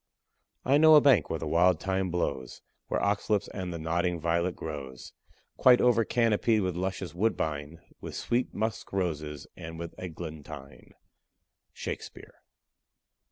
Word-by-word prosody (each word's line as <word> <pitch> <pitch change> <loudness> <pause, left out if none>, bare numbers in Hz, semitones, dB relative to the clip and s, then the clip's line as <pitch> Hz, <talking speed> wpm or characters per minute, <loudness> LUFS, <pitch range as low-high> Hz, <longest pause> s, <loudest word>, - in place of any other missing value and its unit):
I 140 +3 +4
know 155 0 +8
a - - +10
bank 125 - +4
where 80 - -1
the 80 - -5
wild 85 +2 +3
thyme 95 +1 -1
blows, 75 -7 -3 0.2
Where - - -1
ox 100 +2 0
lips 105 -2 +2
and 95 -2 -5
the 85 - -4
nodding 85 +2 -1
violet 85 +2 0
grows, 70 -5 -7 0.4
Quite 125 -1 +6
over 120 -2 +4
canopied 115 -1 +2
with 90 -2 -1
luscious 95 -2 -3
woodbine, 80 -6 -2 0.2
With - - -7
sweet 120 +2 -1
musk 110 +1 -3
roses 75 -6 -2
and 80 0 -8
with 85 0 -6
eglantine. 80 -5 -9 0.8
SHAKESPEARE. - - -7
90 Hz, 140 wpm, -29 LUFS, 80-105 Hz, 0.8 s, a